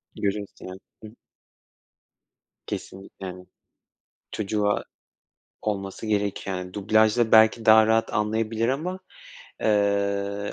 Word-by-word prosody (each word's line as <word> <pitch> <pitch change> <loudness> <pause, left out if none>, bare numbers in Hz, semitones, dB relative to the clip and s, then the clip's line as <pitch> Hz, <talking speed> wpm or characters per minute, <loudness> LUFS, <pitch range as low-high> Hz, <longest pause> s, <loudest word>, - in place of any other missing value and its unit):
Görüyorsun, 100 0 -4
yani. 95 0 -8 0.2
Hı 110 - -8
hı. - - -18 1.5
Kesinlikle, 95 0 -8
yani. 90 0 -8 0.9
Çocuğa 105 0 -1 0.8
olması 100 0 -4
gereken 100 -3 -2
dublajda 110 +3 +2
belki 110 +1 +6
daha 110 0 +7
rahat 110 0 +1
anlayabilir 110 +2 0
ama, 170 +8 -2 0.6
eee, 100 -1 0
105 Hz, 90 wpm, -25 LUFS, 100-110 Hz, 1.5 s, daha